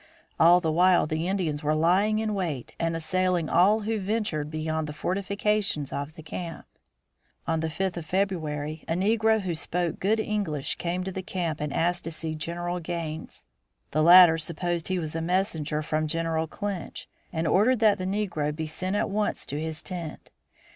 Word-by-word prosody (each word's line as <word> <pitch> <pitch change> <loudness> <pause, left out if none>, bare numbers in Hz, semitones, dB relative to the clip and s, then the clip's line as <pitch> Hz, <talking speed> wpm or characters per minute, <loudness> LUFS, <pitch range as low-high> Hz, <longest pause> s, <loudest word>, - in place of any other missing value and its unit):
All 170 +2 +7
the 160 -3 0
while 180 +3 +4
the 155 +2 -2
Indians 175 -6 -1
were 155 0 +1
lying 185 +7 +3
in 215 -1 -1
wait 165 - -3
and 165 0 0
assailing 175 0 0
all 200 +6 +4
who 220 +1 -1
ventured 195 -7 -1
beyond 155 0 -2
the 150 - -6
fortifications 200 -2 -1
of 145 +2 -4
the 160 - -11
camp. 165 +1 -6 0.8
On 165 0 0
the 160 0 -1
fifth 185 +2 -2
of 170 - -5
February 155 -5 -2
a - - 0
negro 220 +3 +2
who 185 -3 -2
spoke 170 +1 -1
good 215 +4 +2
English 200 -10 -2
came 180 +1 -2
to 190 - -4
the 190 - -4
camp 175 -5 -3
and 150 -1 -2
asked 175 +3 0
to 165 - -4
see 160 0 -4
General 175 +3 -3
Gaines. 165 -2 -5 0.5
The 155 - +1
latter 170 0 +8
supposed 170 +1 -2
he 185 - 0
was 160 -3 -4
a 165 - -1
messenger 160 -4 0
from 155 0 -1
General 165 0 -1
Clinch, 200 0 -5 0.2
and 160 -1 -2
ordered 215 +11 +4
that 210 -3 +4
the 185 - -3
negro 185 -7 -1
be 160 0 -3
sent 185 +5 -2
at - - +1
once 210 +1 -1
to 145 - -4
his 160 0 -3
tent. 170 -4 -7
170 Hz, 180 wpm, -27 LUFS, 155-190 Hz, 0.8 s, latter